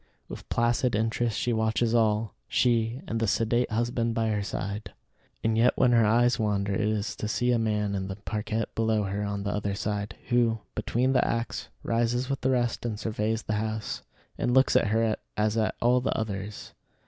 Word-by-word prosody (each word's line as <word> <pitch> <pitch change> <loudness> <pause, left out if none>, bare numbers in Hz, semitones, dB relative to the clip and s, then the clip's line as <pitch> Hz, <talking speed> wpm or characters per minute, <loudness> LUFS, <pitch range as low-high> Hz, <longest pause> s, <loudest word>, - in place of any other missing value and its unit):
With - - -9
placid 120 +1 +1
interest 115 +1 0
she 120 - 0
watches 110 +1 +1
all 110 -2 +2
she, 120 +1 +1
and 115 - -2
the 115 - +1
sedate 115 +4 +1
husband 115 0 0
by 115 -1 +1
her 105 -1 0
side. 100 +1 -4 0.5
And 110 0 +2
yet 115 +2 +3
when 125 - +4
her 115 -1 +5
eyes 120 +3 +3
wander 100 -2 0
it 95 - 0
is 105 0 -1
to 105 - -3
see 125 +3 +1
a 120 - +2
man 105 -2 0
in 95 -1 -2
the 95 - -4
parquette 105 +1 -3
below 110 -1 +1
her 100 +1 -2
on 100 -1 -3
the 100 - -1
other 100 -1 -2
side, 105 +1 -3
who, 120 -2 +3 0.2
between 130 +3 0
the - - +4
acts, 115 0 -2 0.2
rises 120 +3 0
with 135 - -2
the 130 - +1
rest 120 -3 0
and 110 -3 -3
surveys 110 0 -1
the 105 - -2
house, 110 -1 -3 0.4
and 125 - +1
looks 130 0 +4
at - - +4
her 110 +1 +1 0.2
as 105 0 +1
at 110 -1 +1
all 125 +1 +3
the - - -1
others. 105 -1 -5
110 Hz, 195 wpm, -27 LUFS, 105-120 Hz, 0.5 s, her